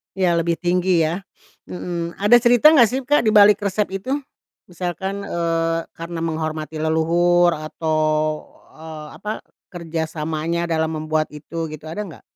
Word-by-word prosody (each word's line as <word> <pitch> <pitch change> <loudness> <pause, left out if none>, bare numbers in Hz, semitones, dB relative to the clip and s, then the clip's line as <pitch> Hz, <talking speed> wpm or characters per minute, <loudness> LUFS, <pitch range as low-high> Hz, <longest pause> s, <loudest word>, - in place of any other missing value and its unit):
Iya 175 -3 +2
lebih 170 0 0
tinggi 180 -1 +1
ya. 165 +4 -1 0.5
Mhm, 170 -1 -5
ada 205 +5 +5
cerita 245 +6 +6
gak 250 -7 +6
sih 255 +4 -2
Kak 290 -1 +2
dibalik 210 -1 +6
resep 205 0 -1
itu? 255 +7 -6 0.6
Misalkan, 185 +3 -4
eee, 165 -2 -1 0.2
karena 170 0 -6
menghormati 155 -1 -3
leluhur 170 +2 +3
atau, 155 +1 -2 0.8
eee, 155 -1 -9
apa, 210 - -4 0.4
kerja 170 -3 -4
samanya 160 +2 -2
dalam 160 -1 -1
membuat 155 0 -1
itu 160 +2 -6
gitu, 155 -1 -9
ada 205 - -4
nggak? 165 - -13
170 Hz, 140 wpm, -21 LUFS, 160-190 Hz, 0.8 s, cerita